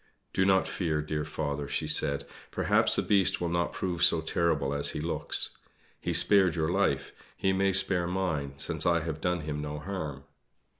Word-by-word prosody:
"Do 95 Hz, -, +2 dB
not 95 Hz, -1 st, +3 dB
fear, 80 Hz, -5 st, -2 dB
dear 75 Hz, 0 st, -3 dB
father," 75 Hz, -2 st, -4 dB
she -, -, -2 dB
said, 70 Hz, 0 st, +1 dB, 0.2 s
"perhaps -, -, +2 dB
the -, -, 0 dB
Beast 100 Hz, -3 st, +3 dB
will 85 Hz, -, -2 dB
not 85 Hz, 0 st, 0 dB
prove 90 Hz, -2 st, -3 dB
so 85 Hz, -, +5 dB
terrible 80 Hz, -4 st, 0 dB
as 70 Hz, 0 st, +1 dB
he -, -, -3 dB
looks. 80 Hz, +3 st, -1 dB, 0.5 s
He -, -, -3 dB
spared 95 Hz, -5 st, +4 dB
your 80 Hz, 0 st, 0 dB
life; 100 Hz, +2 st, 0 dB, 0.3 s
he 95 Hz, -, +1 dB
may 95 Hz, +1 st, +2 dB
spare 95 Hz, -2 st, +3 dB
mine, 85 Hz, -7 st, -2 dB
since 70 Hz, -, 0 dB
I 85 Hz, -1 st, +3 dB
have 80 Hz, -1 st, -5 dB
done 90 Hz, -1 st, 0 dB
him 75 Hz, -1 st, -4 dB
no 75 Hz, 0 st, -5 dB
harm." 75 Hz, -5 st, -5 dB
85 Hz, 185 wpm, -29 LUFS, 75-95 Hz, 0.5 s, so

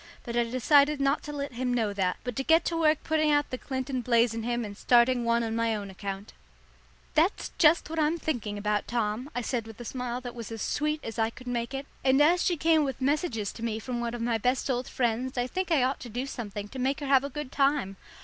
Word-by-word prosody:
But 235 Hz, -, -5 dB
I 240 Hz, 0 st, +3 dB
decided 280 Hz, +5 st, +3 dB
not 275 Hz, +2 st, +2 dB
to 295 Hz, -, -5 dB
let 280 Hz, -2 st, -4 dB
him 250 Hz, +1 st, -1 dB
know 225 Hz, -4 st, 0 dB
that, 185 Hz, -2 st, 0 dB
but 245 Hz, -2 st, -4 dB
to 270 Hz, -, 0 dB
get 325 Hz, +4 st, +4 dB
to 335 Hz, -, -1 dB
work 315 Hz, -2 st, +2 dB
putting 310 Hz, -1 st, +2 dB
out 290 Hz, -1 st, +2 dB
the 255 Hz, -, -2 dB
Clinton 260 Hz, -1 st, -3 dB
blaze 235 Hz, -1 st, +3 dB
in 225 Hz, -, -3 dB
him 240 Hz, 0 st, -1 dB
and 205 Hz, -1 st, -7 dB
starting 240 Hz, +3 st, +4 dB
one 235 Hz, 0 st, +2 dB
on 225 Hz, -1 st, -2 dB
my 230 Hz, -1 st, +1 dB
own 200 Hz, -2 st, -5 dB
account. 195 Hz, +1 st, -6 dB, 0.8 s
"That's 330 Hz, +6 st, +1 dB
just 325 Hz, +1 st, +5 dB
what 325 Hz, +1 st, -3 dB
I'm 310 Hz, +2 st, +2 dB
thinking 235 Hz, -10 st, -3 dB
about, 210 Hz, 0 st, -1 dB
Tom," 235 Hz, +2 st, -1 dB
I 245 Hz, -, 0 dB
said 235 Hz, -1 st, -2 dB
with 225 Hz, 0 st, -11 dB
a 240 Hz, -, -7 dB
smile 250 Hz, +1 st, -3 dB
that 245 Hz, -1 st, -6 dB
was 230 Hz, -2 st, -7 dB
as 225 Hz, -1 st, -4 dB
sweet 300 Hz, +1 st, -1 dB
as 225 Hz, 0 st, -6 dB
I 225 Hz, 0 st, +2 dB
could 250 Hz, +2 st, -13 dB
make 240 Hz, +1 st, -2 dB
it, 270 Hz, +1 st, -4 dB, 0.2 s
"and 265 Hz, +1 st, +4 dB
as 340 Hz, +4 st, +5 dB
she 350 Hz, -, +1 dB
came 320 Hz, 0 st, +3 dB
with 270 Hz, -3 st, -3 dB
messages 260 Hz, -, 0 dB
to 230 Hz, -, -10 dB
me 225 Hz, -2 st, -1 dB
from 240 Hz, +2 st, -4 dB
one 235 Hz, 0 st, -2 dB
of 240 Hz, -, -5 dB
my 230 Hz, -1 st, +1 dB
best 255 Hz, +4 st, +1 dB
old 250 Hz, 0 st, -2 dB
friends 250 Hz, +1 st, -1 dB
I 245 Hz, -, +1 dB
think 370 Hz, +7 st, -3 dB
I 295 Hz, -6 st, +4 dB
ought 265 Hz, +2 st, 0 dB
to 245 Hz, -, -8 dB
do 245 Hz, +4 st, -3 dB
something 210 Hz, -6 st, -6 dB
to 260 Hz, -, -8 dB
make 270 Hz, +3 st, 0 dB
her -, -, -3 dB
have 270 Hz, -1 st, +4 dB
a 280 Hz, -, -3 dB
good 290 Hz, -1 st, -6 dB
time. 275 Hz, -8 st, +1 dB
250 Hz, 255 wpm, -28 LUFS, 230-285 Hz, 0.8 s, just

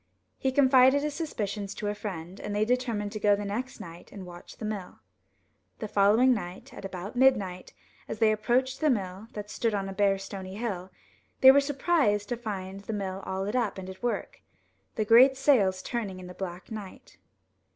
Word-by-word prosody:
He 265 Hz, -, +1 dB
confided 265 Hz, +1 st, +5 dB
his 300 Hz, -1 st, -2 dB
suspicions 210 Hz, -, -4 dB
to 210 Hz, -, -4 dB
a 205 Hz, -, 0 dB
friend, 185 Hz, -3 st, -7 dB
and 205 Hz, -, -4 dB
they 210 Hz, +1 st, +2 dB
determined 230 Hz, -4 st, -1 dB
to 215 Hz, -, -5 dB
go 205 Hz, 0 st, +4 dB
the 205 Hz, 0 st, -5 dB
next 235 Hz, +6 st, -4 dB
night 170 Hz, 0 st, -11 dB
and 195 Hz, -3 st, -9 dB
watch 175 Hz, -1 st, -12 dB
the 220 Hz, -, -6 dB
mill. 205 Hz, -4 st, -5 dB, 0.8 s
The 215 Hz, -, -5 dB
following 210 Hz, +6 st, +4 dB
night, 180 Hz, -5 st, -6 dB
at -, -, -10 dB
about 190 Hz, +2 st, -6 dB
midnight, 205 Hz, -9 st, +2 dB, 0.3 s
as -, -, -5 dB
they 215 Hz, 0 st, +4 dB
ap 215 Hz, 0 st, -6 dB
proached 260 Hz, +3 st, +1 dB
the 310 Hz, -, +2 dB
mill, 195 Hz, -3 st, -2 dB
that 210 Hz, 0 st, -7 dB
stood 225 Hz, -1 st, 0 dB
on 195 Hz, -1 st, -2 dB
a 195 Hz, -, -5 dB
bare 195 Hz, 0 st, +2 dB
stony 195 Hz, -1 st, -7 dB
hill, 200 Hz, -5 st, -4 dB, 0.5 s
they 265 Hz, -, +11 dB
were 280 Hz, +1 st, +5 dB
surprised 275 Hz, -8 st, +1 dB
to 240 Hz, -, 0 dB
find 195 Hz, -4 st, -5 dB
the 205 Hz, +3 st, -6 dB
mill 195 Hz, -2 st, -3 dB
all 190 Hz, 0 st, -2 dB
lit 205 Hz, +4 st, -3 dB
up 230 Hz, -6 st, 0 dB
and 190 Hz, -1 st, -7 dB
at 190 Hz, -, -14 dB
work, 240 Hz, -1 st, -3 dB, 0.5 s
the 215 Hz, -, 0 dB
great 255 Hz, +5 st, +7 dB
sails 205 Hz, -10 st, +3 dB
turning 205 Hz, -6 st, -4 dB
in 185 Hz, -, -9 dB
the 180 Hz, -, -9 dB
black 180 Hz, 0 st, -7 dB
night. 210 Hz, -3 st, -9 dB
210 Hz, 200 wpm, -28 LUFS, 190-245 Hz, 0.8 s, they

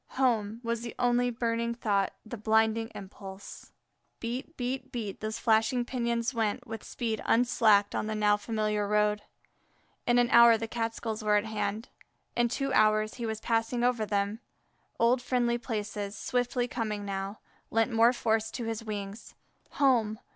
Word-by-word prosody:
home! 225 Hz, -4 st, +1 dB
was 230 Hz, 0 st, -2 dB
the 235 Hz, -1 st, -6 dB
only 245 Hz, 0 st, +2 dB
burning 235 Hz, 0 st, -1 dB
thought, 200 Hz, -4 st, +1 dB
the 220 Hz, -, -6 dB
blinding 220 Hz, +1 st, +2 dB
impulse. 195 Hz, 0 st, -10 dB, 0.5 s
Beat, 250 Hz, +7 st, -5 dB
beat, 260 Hz, +1 st, -3 dB
beat, 215 Hz, -5 st, -5 dB
those 215 Hz, +1 st, -3 dB
flashing 230 Hz, +2 st, +2 dB
pinions 235 Hz, 0 st, -1 dB
went 230 Hz, +2 st, -1 dB
with 225 Hz, -2 st, -7 dB
speed 225 Hz, -3 st, -3 dB
unslacked 225 Hz, -4 st, +4 dB
on -, -, -1 dB
the 215 Hz, -, -2 dB
now 210 Hz, -1 st, +3 dB
familiar 210 Hz, -1 st, -1 dB
road. 210 Hz, 0 st, +2 dB, 0.9 s
In 240 Hz, 0 st, +4 dB
an 240 Hz, -1 st, +3 dB
hour 235 Hz, -1 st, +8 dB
the 225 Hz, +1 st, -4 dB
Catskills 225 Hz, -1 st, -3 dB
were 210 Hz, 0 st, +3 dB
at 205 Hz, +1 st, +2 dB
hand. 215 Hz, +1 st, -3 dB, 0.5 s
In 240 Hz, 0 st, +3 dB
two 275 Hz, +3 st, -2 dB
hours 215 Hz, -1 st, +3 dB
he 235 Hz, -2 st, -4 dB
was 220 Hz, -1 st, -3 dB
passing 230 Hz, +1 st, 0 dB
over 245 Hz, -2 st, +2 dB
them. 205 Hz, +1 st, -1 dB, 0.6 s
Old 240 Hz, +2 st, +3 dB
friendly 240 Hz, -1 st, +1 dB
places, 210 Hz, -3 st, -4 dB
swiftly 245 Hz, 0 st, -1 dB
coming 215 Hz, -4 st, -3 dB
now, 195 Hz, +1 st, -4 dB, 0.3 s
lent 225 Hz, +2 st, +1 dB
more 230 Hz, +1 st, +6 dB
force 225 Hz, -3 st, 0 dB
to 245 Hz, -, -5 dB
his 225 Hz, 0 st, -3 dB
wings. 205 Hz, -1 st, -6 dB, 0.4 s
Home! 240 Hz, -7 st, +2 dB
225 Hz, 155 wpm, -29 LUFS, 215-240 Hz, 0.9 s, hour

